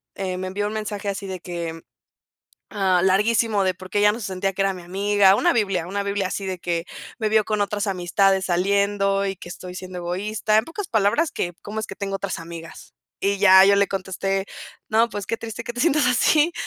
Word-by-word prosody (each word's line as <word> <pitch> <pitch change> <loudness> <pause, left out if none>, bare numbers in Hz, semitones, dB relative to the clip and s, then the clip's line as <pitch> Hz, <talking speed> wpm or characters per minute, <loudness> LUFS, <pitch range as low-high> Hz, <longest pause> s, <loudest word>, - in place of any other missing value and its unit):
eh, 185 -1 -3
me 185 0 -4
envió 205 +2 -2
un 210 - -5
mensaje 210 -1 -4
así 200 0 -4
de 190 -1 -5
que, 170 -2 -6 0.9
ah, 190 -3 +2
larguísimo 210 +2 +2
de 185 -1 +1
porque 185 +2 -6
ella 210 0 +5
no 230 - -6
se 210 - -4
sentía 195 +1 -2
que 195 - -2
era 195 0 +2
mi 180 -1 -10
amiga. 195 +2 +3
Una - - +3
Biblia 195 -7 0
una 200 +2 -2
Biblia 200 -1 -1
así 195 +1 -4
de 185 -1 -4
que 170 -1 -2 0.3
me 215 -2 0
vio 215 0 +4
con 215 -1 -1
otras 205 +1 -1
amistades 190 +1 +2
saliendo 195 +2 +1
y 195 0 -2
que 175 - -10
estoy 180 +1 -8
siendo 185 0 -7
egoísta, 205 +5 -1
en 220 - +2
pocas 375 +4 -6
palabras 230 +10 +2
que 175 - -3
cómo 215 +1 -5
es 220 - -4
que 195 - -8
tengo 195 0 -3
otras 195 -1 -3
amigas 165 0 -10 0.3
y 200 +1 +1
ya 190 -1 +8
yo 200 0 +5
le 200 0 +3
contesté. 195 0 -2 0.4
No 225 +2 +3
pues, 205 -1 -5
qué - - 0
triste 230 +1 -7
que 240 - -6
te 245 - -3
sientas 305 -2 +3
así, 300 +6 +3
195 Hz, 220 wpm, -23 LUFS, 185-210 Hz, 0.9 s, ya